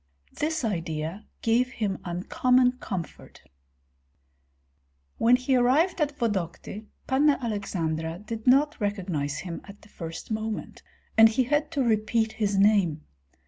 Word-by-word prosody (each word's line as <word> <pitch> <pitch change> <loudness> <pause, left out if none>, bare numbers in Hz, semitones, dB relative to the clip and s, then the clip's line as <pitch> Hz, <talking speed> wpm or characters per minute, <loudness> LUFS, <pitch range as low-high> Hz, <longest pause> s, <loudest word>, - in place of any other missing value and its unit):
This 315 -3 -1
idea 165 -1 -3 0.2
gave 245 +3 +2
him 200 -4 -2
uncommon 250 +8 +2
comfort. 185 -9 -7 1.8
When 240 +2 +6
he 255 +1 +1
arrived 290 +9 +3
at 290 -1 0
Vodokty, 210 0 -3 0.2
Panna 280 +2 +3
Aleksandra 170 -8 -3
did 220 +4 -7
not 280 +2 +4
recognize 180 -9 -2
him 175 -2 -6
at 200 +1 -14
the 215 - -17
first 165 +3 -8
moment, 220 0 -4 0.4
and 225 0 +9
he 240 +4 +1
had 295 +4 0
to 275 - +1
repeat 220 0 +1
his 205 -2 -1
name. 195 -7 +3
220 Hz, 125 wpm, -26 LUFS, 185-250 Hz, 1.8 s, and